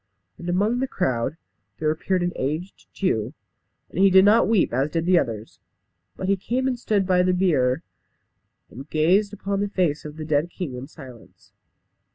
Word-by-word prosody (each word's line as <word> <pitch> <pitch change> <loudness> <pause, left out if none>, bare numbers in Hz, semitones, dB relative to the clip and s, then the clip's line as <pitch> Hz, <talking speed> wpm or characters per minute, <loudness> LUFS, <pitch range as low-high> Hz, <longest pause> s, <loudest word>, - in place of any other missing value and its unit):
And 175 - -6
among 205 +7 +1
the 265 - 0
crowd 130 - -1 0.4
there 155 -1 +1
appeared 180 +3 -1
an 175 - -1
aged 155 +8 -4
Jew. 125 - -1 0.6
And - - -5
he 195 0 +6
did 190 +1 +6
not 215 +3 +5
weep 210 - +2
as 135 +4 +1
did 165 +1 -2
the 180 -1 +5
others; 115 -5 -5 0.6
but 185 - -4
he 195 - +3
came 245 +7 -2
and 250 -2 -1
stood 205 -4 +1
by 180 -1 +3
the 180 0 +2
bier, 150 -6 +1 0.9
and 135 +5 -10
gazed 185 +7 +2
upon 200 -1 -3
the 205 - -1
face 175 -7 0
of 150 0 -9
the 155 - -5
dead 150 +2 +1
king 175 -6 -5
in 125 +2 -7
silence. 130 -7 -15
175 Hz, 185 wpm, -23 LUFS, 145-195 Hz, 0.9 s, he